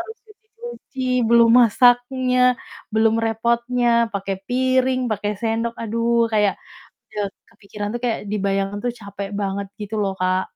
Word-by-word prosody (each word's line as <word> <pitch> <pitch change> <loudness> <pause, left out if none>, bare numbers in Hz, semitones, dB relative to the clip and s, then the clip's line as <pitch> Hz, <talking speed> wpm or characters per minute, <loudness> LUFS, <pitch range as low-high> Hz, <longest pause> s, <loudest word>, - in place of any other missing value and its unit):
harus 445 +6 -8
cuci-cuci, 440 - -11 0.3
belum 235 0 +6
masaknya, 245 +2 +3 0.5
belum 220 0 +3
repotnya, 235 +2 0 0.2
pake 195 -1 -3 0.2
piring, 260 0 +1
pake 210 -1 -2
sendok, 230 0 -1
aduh 230 +1 +1
kayak 210 -2 +2 0.6
ya 210 -1 -1 0.2
kepikiran 205 -2 -7
tuh - - -7
kayak 235 -2 0
dibayangin 195 -1 -1
tuh 245 - 0
capek 200 -1 -7
banget 200 0 -2
gitu 210 +1 -6
loh, 195 -1 -1
Kak. 185 0 +1
230 Hz, 130 wpm, -21 LUFS, 205-245 Hz, 0.6 s, belum